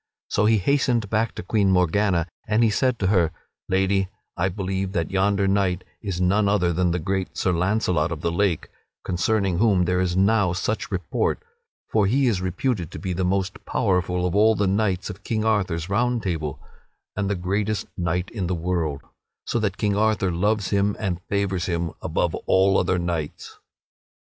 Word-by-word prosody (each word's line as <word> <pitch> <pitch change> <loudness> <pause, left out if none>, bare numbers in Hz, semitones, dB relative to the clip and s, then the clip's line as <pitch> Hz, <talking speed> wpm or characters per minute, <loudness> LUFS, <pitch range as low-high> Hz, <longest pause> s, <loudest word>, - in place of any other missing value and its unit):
So 105 - +2
he 110 0 +4
hastened 120 -1 +1
back 110 +1 0
to - - -6
Queen 100 +1 +2
Morgana 90 0 +2 0.2
and 110 +2 +3
he 110 - +4
said 125 +2 +1
to 95 - 0
her: 85 -5 +3 0.4
"Lady, 95 0 +1 0.3
I 90 +1 +1
believe 95 0 -3
that 85 -4 -1
yonder 100 +1 +2
knight 95 -2 +1 0.2
is 95 -5 -3
none 100 +3 +2
other 90 -4 +2
than 90 +1 +1
the 85 - 0
great 95 +2 -3
Sir 90 - +1
Launcelot 90 -2 +1
of 80 -2 -4
the 85 - 0
Lake, 90 -2 0 0.4
concerning 95 0 0
whom 100 -5 +3
there 90 +1 +1
is 90 -1 0
now 100 -2 +3
such 105 +4 -2
report; - - -1 0.5
for 105 -3 +3
he 135 +6 +2
is 105 -7 +1
reputed 95 - -1
to - - -8
be 95 -2 -3
the 95 +2 -1
most 95 +2 -1
powerful 90 -3 0
of 90 - -1
all 110 +2 +4
the 100 - +1
knights 95 -1 0
of 100 +2 -13
King 110 +1 -1
Arthur's 95 -7 0
Round 120 +4 0
Table, 80 -6 -3 0.6
and 100 -1 -1
the 100 - 0
greatest 100 +4 -1
knight 90 +1 -2
in 95 -6 -3
the 90 - -1
world, 80 -4 -2 0.4
so 120 - -1
that 100 -3 -1
King 105 -1 0
Arthur 105 -3 +2
loves 105 +4 0
him 100 0 +2
and 90 -4 -2
favors 100 -3 0
him 85 -2 -1
above - - 0
all 95 +1 +4
other 95 - +1
knights." 85 -4 -4
95 Hz, 185 wpm, -24 LUFS, 90-105 Hz, 0.6 s, he